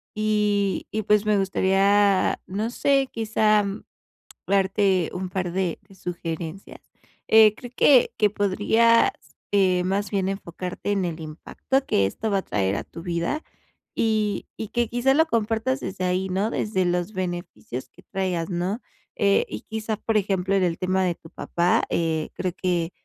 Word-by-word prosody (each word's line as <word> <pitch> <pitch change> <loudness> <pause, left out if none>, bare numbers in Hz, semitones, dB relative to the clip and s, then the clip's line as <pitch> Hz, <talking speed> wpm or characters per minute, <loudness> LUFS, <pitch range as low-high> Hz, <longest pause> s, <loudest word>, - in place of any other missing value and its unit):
y 210 -2 +1
y, 215 0 -2
pues, 210 +1 +3
me 210 -1 +3
gustaría, 195 +1 +3
no 210 +5 -2
sé, 275 +1 +2
quizá, 215 -2 +2 0.8
darte 195 -2 +2
un 185 0 -4
par 180 -1 -2
de 180 -2 -1
de 195 -1 -19
sugerencias. 170 0 -6 0.5
Eh, 220 -1 +7
creo 245 - -10
que 260 -1 +5
que 210 - +4
podrías, 220 - +3 0.4
eh, 185 -3 +3
más 195 +1 -1
bien, 195 -2 0
enfocarte 185 0 -5
en 195 -3 +1
el 170 -1 -4
impacto 160 - -2
que 100 - +3
esto 220 - -3
va 200 -1 +2
a - - -4
traer 95 -1 0
a - - -3
tu 165 - -11
vida, 170 - -2 0.5
y 215 -2 0
y 220 - -5
que 240 -1 0
quizás, 245 +3 +2
lo 320 +2 +4
compartas 230 +1 0
desde 190 -8 -5
ahí, 185 +1 0
¿no?, 195 +4 0
desde 210 -5 0
los 175 +3 -1
beneficios 175 - -5
que - - -19
traigas, 185 -3 -2
¿no?, 185 +6 -2 0.3
eh, 200 -1 +3
y - - -6
quizás, 220 -1 -4
por 225 -1 0
ejemplo, 195 -1 0
en 190 - +2
el 170 -2 0
tema 185 +1 +1
de 180 -1 +1
tu 160 - -16
papá, 175 +2 0
eh, 160 -2 -1
creo 185 -2 -3
que 175 -2 0
195 Hz, 165 wpm, -24 LUFS, 180-215 Hz, 0.8 s, Eh